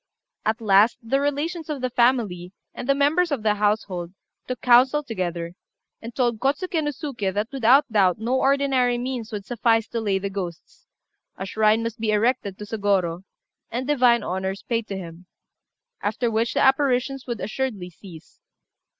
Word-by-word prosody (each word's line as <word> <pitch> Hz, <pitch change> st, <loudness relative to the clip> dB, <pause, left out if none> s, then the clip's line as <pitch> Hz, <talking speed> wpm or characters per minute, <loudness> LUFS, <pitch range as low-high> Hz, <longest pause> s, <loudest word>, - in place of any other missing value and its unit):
At 220 Hz, +2 st, 0 dB
last 210 Hz, +2 st, +4 dB
the 270 Hz, +5 st, 0 dB
relations 310 Hz, +4 st, -2 dB
of 295 Hz, -2 st, -3 dB
the 255 Hz, 0 st, -2 dB
family 225 Hz, -8 st, +1 dB, 0.2 s
and 250 Hz, -, -7 dB
the 275 Hz, -, +5 dB
members 310 Hz, +5 st, +2 dB
of 265 Hz, -7 st, -2 dB
the 215 Hz, -1 st, +3 dB
household 205 Hz, -4 st, -1 dB, 0.3 s
took 255 Hz, -, -4 dB
counsel 260 Hz, +4 st, +4 dB
together, 175 Hz, -8 st, -4 dB, 0.5 s
and 230 Hz, 0 st, -9 dB
told 240 Hz, -4 st, 0 dB
Kôtsuké 315 Hz, -, 0 dB
no 295 Hz, -, 0 dB
Suké 265 Hz, -, -3 dB
that 210 Hz, +4 st, -2 dB
without 270 Hz, +2 st, +4 dB
doubt 190 Hz, -5 st, +3 dB
no 240 Hz, +4 st, 0 dB
ordinary 270 Hz, -3 st, +2 dB
means 245 Hz, -2 st, -4 dB
would 205 Hz, -2 st, -5 dB
suffice 225 Hz, -1 st, +1 dB
to 230 Hz, -, -3 dB
lay 200 Hz, -3 st, +1 dB
the 195 Hz, +1 st, -4 dB
ghosts; 180 Hz, -4 st, -7 dB, 0.5 s
a 190 Hz, -, -4 dB
shrine 215 Hz, +3 st, +2 dB
must 230 Hz, 0 st, -4 dB
be 220 Hz, -1 st, -1 dB
erected 210 Hz, -2 st, +1 dB
to 210 Hz, -, -7 dB
Sôgorô, 195 Hz, -5 st, 0 dB, 0.5 s
and 245 Hz, +3 st, -3 dB
divine 250 Hz, -5 st, +3 dB
honours 190 Hz, +1 st, -3 dB
paid 230 Hz, -2 st, -2 dB
to 195 Hz, -, -4 dB
him, 175 Hz, -1 st, -10 dB, 0.7 s
after 230 Hz, +3 st, -1 dB
which 225 Hz, +1 st, 0 dB
the -, -, +2 dB
apparitions 265 Hz, -1 st, +2 dB
would 235 Hz, -3 st, -3 dB
assuredly 210 Hz, -4 st, -3 dB
cease. 170 Hz, -1 st, -14 dB
230 Hz, 165 wpm, -23 LUFS, 200-260 Hz, 0.7 s, the